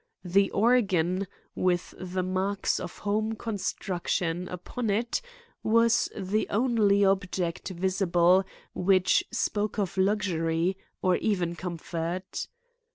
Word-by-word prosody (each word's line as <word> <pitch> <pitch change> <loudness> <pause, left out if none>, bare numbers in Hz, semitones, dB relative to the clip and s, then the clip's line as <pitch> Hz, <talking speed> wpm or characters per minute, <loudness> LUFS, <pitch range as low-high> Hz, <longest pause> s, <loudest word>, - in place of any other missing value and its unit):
The 195 +3 +3
organ, 195 -5 +2 0.3
with 180 -1 0
the 185 0 -2
marks 190 +2 0
of - - -7
home 215 +2 -1
construction 180 -5 -2
upon 210 +7 -4
it, 230 +4 0 0.4
was 230 +1 +3
the 205 +2 -1
only 210 -3 +3
object 185 -2 0
visible 185 0 +3 0.3
which 185 0 +3
spoke 215 -2 -1
of 200 -2 -2
luxury 185 -3 +1 0.3
or 185 -1 +3
even 180 -5 0
comfort. 170 +1 -4
190 Hz, 100 wpm, -28 LUFS, 180-210 Hz, 0.4 s, The